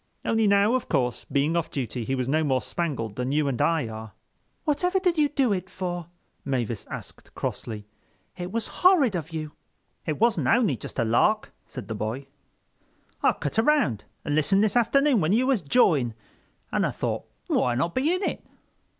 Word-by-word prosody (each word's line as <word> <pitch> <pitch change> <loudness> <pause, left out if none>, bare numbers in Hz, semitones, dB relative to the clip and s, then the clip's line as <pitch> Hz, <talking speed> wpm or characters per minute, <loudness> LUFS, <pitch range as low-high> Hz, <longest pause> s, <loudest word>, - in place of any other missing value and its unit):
Only 225 -1 +2
now, 200 +3 +4
of 255 - -1
course, 125 -1 0
being 145 +4 +2
off 170 -1 0
duty 125 -3 -3
he 135 - -1
was 130 -1 -2
no 155 +4 +2
more 135 -3 +2
spangled 130 -6 -3
than 125 +1 -1
you 150 0 +2
and 130 -4 -1
I 165 -7 +2
are. 110 -1 -8 0.5
"Whatever 360 +5 +1
did 365 -2 +2
you 300 -2 +3
do 270 -7 +2
it 185 -1 -4
for?" 175 -3 -4 0.4
Mavis 120 -5 -2
asked - - -9
crossly. 105 -3 -4 0.5
"It 180 0 -5
was 230 0 -2 0.2
horrid 355 - +5
of 165 -2 -3
you." 155 -2 -5 0.6
"It 155 - -1
wasn't 230 0 +2
only 225 - +3
just 110 - -9
a 120 - +2
lark," 210 - +2
said 130 - -8
the 115 - -3
boy. 110 +6 -4 1.0
"I - - +4
cut 145 +9 -2
around 225 - +2 0.2
and 145 - -1
listened 190 +7 +3
this 215 - +1
afternoon 255 +1 +3
when 160 +4 +2
you 245 +4 +3
was 260 -6 +2
jawing, 145 - +3 0.6
and - - +1
I - - +2
thought - - -3 0.2
why 120 -1 +1
not 165 +8 0
be 280 +6 +1
in 365 +2 0
it? - - -2
165 Hz, 185 wpm, -26 LUFS, -, 1.0 s, horrid